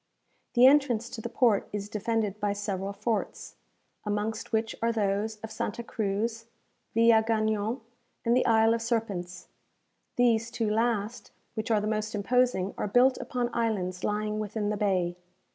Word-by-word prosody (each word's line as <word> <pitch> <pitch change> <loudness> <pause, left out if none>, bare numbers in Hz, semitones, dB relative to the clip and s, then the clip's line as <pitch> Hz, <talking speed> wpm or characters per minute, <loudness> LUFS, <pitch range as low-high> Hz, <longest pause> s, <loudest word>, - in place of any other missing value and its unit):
The 245 +1 +7
entrance 260 -5 +4
to 225 - -6
the - - -5
port 230 -6 +2
is 205 -1 -4
defended 210 -1 -1
by 205 -1 0
several 200 -1 -3
forts, 215 +1 -3 0.5
amongst 215 +2 -3
which 220 0 0
are 230 0 +2
those 210 0 0
of 220 - -7
Santa 230 +2 -3
Cruz, 225 +1 -2 0.5
Villagagnon, 220 0 +3 0.4
and 235 +1 +3
the 255 - +2
Isle 225 0 +5
of 230 - -1
Serpents. 200 -7 -3 0.7
These 230 -2 +3
two 230 -2 -1
last, 225 0 -1 0.2
which 220 0 -4
are 220 -2 +3
the - - -3
most 215 0 -2
imposing, 210 -2 +1
are - - -1
built 250 +5 +4
upon 245 -1 -2
islands 190 -6 -1
lying 210 0 -1
within 210 0 -2
the 210 - -2
bay. 185 -4 0
220 Hz, 150 wpm, -28 LUFS, 205-230 Hz, 0.7 s, The